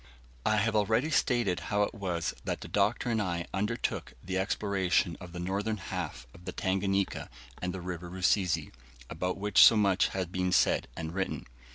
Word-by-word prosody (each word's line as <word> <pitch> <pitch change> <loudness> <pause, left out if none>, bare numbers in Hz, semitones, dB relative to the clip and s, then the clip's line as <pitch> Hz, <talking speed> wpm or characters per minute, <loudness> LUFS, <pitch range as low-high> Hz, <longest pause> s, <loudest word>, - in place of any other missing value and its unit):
I 110 - +4
have 110 +1 +1
already 110 +8 +2
stated 120 - +2
how 105 0 +3
it - - -2
was 90 -6 -2
that - - -3
the - - -7
Doctor 105 +4 +1
and 110 -1 +1
I 85 -3 -2
undertook 105 +4 -2
the 95 +1 -3
exploration 95 -3 +1
of 90 -2 -9
the 90 - -8
northern 100 +5 -1
half 90 -8 -5
of 90 - -15
the 90 - -3
Tanganika 95 +1 -1 0.3
and 90 - -1
the 95 0 -6
River 90 -1 -5
Rusizi, 95 0 +1 0.4
about 90 +3 -2
which 105 -1 +4
so 115 - +9
much 100 -3 +3
had 95 -2 -3
been 90 0 0
said - - +3
and 80 0 -4
written. 95 0 -2
95 Hz, 180 wpm, -30 LUFS, 90-105 Hz, 0.4 s, so